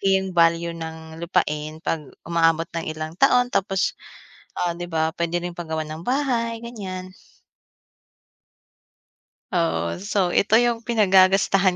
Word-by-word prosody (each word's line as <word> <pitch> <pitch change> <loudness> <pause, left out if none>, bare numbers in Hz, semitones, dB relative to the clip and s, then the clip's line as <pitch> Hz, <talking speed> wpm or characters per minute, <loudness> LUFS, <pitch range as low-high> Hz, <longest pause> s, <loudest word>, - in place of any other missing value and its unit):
Malaki 195 - +1 0.2
yung 190 - -5
value 170 0 +3
ng 160 0 -8
lupain 155 -2 -1
'pag 160 - 0 0.2
umaabot 165 -1 +2
ng 165 -1 -3
ilang 155 0 -5
taon 245 0 +4
tapos, 195 0 +1 0.7
ah, 170 -1 0
di 175 - -5
ba, 160 -2 0
puwede 170 +1 -1
rin 175 0 -6
pagawa 160 -2 -4
ng 155 +2 -7
bahay 240 -4 0
ganyan. 185 -6 -7 2.4
Oo, 85 - 0
so 195 -3 0
ito 215 +2 +3
yung 240 -1 +3
pinagagastahan 195 -3 +4
175 Hz, 130 wpm, -23 LUFS, 160-195 Hz, 2.4 s, taon